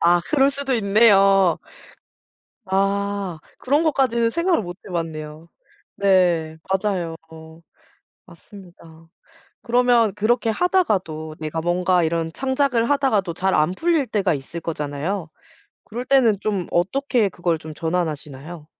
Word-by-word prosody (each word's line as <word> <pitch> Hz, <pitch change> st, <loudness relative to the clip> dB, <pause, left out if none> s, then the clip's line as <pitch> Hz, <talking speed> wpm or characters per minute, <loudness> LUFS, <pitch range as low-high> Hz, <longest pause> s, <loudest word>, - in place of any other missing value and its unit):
아 175 Hz, +1 st, +4 dB
그럴 275 Hz, -2 st, +4 dB
수도 280 Hz, -1 st, -3 dB
있네요. 195 Hz, -4 st, +4 dB, 1.1 s
아. 195 Hz, -2 st, -1 dB, 0.2 s
그런 290 Hz, +5 st, +1 dB
것까지는 255 Hz, -7 st, +1 dB
생각을 335 Hz, +3 st, +1 dB
못 175 Hz, -1 st, -8 dB
해봤네요. 160 Hz, -2 st, -6 dB, 0.5 s
네 175 Hz, -5 st, +2 dB
맞아요. 190 Hz, -4 st, -1 dB, 1.1 s
맞습니다. 170 Hz, -5 st, -16 dB, 0.5 s
그러면 240 Hz, -3 st, +3 dB
그렇게 225 Hz, +2 st, +1 dB
하다가도 195 Hz, -, 0 dB
내가 155 Hz, +1 st, -4 dB
뭔가 175 Hz, +1 st, +1 dB
이런 165 Hz, 0 st, -1 dB
창작을 260 Hz, -, 0 dB
하다가도 255 Hz, -11 st, +1 dB
잘 190 Hz, +3 st, 0 dB
안 155 Hz, +1 st, +2 dB
풀릴 315 Hz, -, 0 dB
때가 205 Hz, -5 st, 0 dB
있을 150 Hz, +4 st, -6 dB
거잖아요? 155 Hz, +3 st, -4 dB, 0.6 s
그럴 240 Hz, +3 st, -6 dB
때는 250 Hz, -7 st, +3 dB
좀 200 Hz, -5 st, -2 dB
어떻게 235 Hz, +5 st, +1 dB
그걸 175 Hz, -3 st, -2 dB
좀 155 Hz, 0 st, -10 dB
전환하시나요? 155 Hz, -2 st, -4 dB
190 Hz, 265 characters per minute, -21 LUFS, 165-235 Hz, 1.1 s, 아